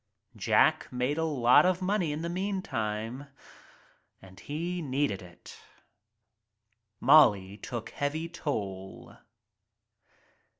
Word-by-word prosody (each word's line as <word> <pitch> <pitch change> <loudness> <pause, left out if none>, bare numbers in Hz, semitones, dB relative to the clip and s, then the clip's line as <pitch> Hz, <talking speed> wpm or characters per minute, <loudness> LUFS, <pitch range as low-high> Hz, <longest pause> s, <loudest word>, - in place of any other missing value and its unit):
Jack - - +2
made 125 +5 -1
a - - +1
lot 130 -6 +4
of 185 -1 +2
money 185 -4 0
in 150 +2 -4
the - - -2
meantime, 140 - -3 0.9
and 95 -1 -15
he 170 +4 -4
needed 135 - -1
it. 90 -1 -14 1.4
Molly 105 -9 +5
took 115 +2 -6
heavy 155 +3 -3
toll. 100 - -6
145 Hz, 95 wpm, -29 LUFS, 105-165 Hz, 1.4 s, Molly